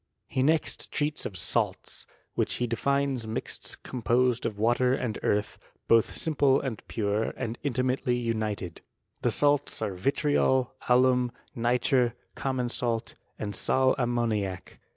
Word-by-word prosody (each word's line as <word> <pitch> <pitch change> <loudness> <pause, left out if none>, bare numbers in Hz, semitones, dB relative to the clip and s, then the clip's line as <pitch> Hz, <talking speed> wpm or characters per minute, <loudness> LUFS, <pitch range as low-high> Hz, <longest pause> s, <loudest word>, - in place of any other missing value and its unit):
He 130 - -1
next 155 +3 +1
treats 150 0 -1
of 95 - -8
salts, - - -2 0.3
which - - 0
he 125 - 0
defines 135 +1 0
mixts 110 - -4
composed 125 0 +1
of 105 - -5
water 120 +4 +3
and 120 -5 -3
earth; 105 +1 0 0.3
both 115 -1 +4
simple 140 -4 +3
and 125 -6 -4
pure, 105 0 0
and 115 +1 -4
intimately 130 -1 0
united. 110 -7 -2 0.4
The - - +2
salts 145 -1 +2
are 105 -3 -2
vitriol, 130 +4 +1 0.2
alum, 125 0 +4 0.2
nitre, 120 +1 +2 0.2
common 130 -2 -1
salt, 120 -2 -1 0.2
and 105 -2 -4
sal 130 +6 +3
ammoniac. 115 -6 -1
120 Hz, 130 wpm, -28 LUFS, 110-130 Hz, 0.4 s, both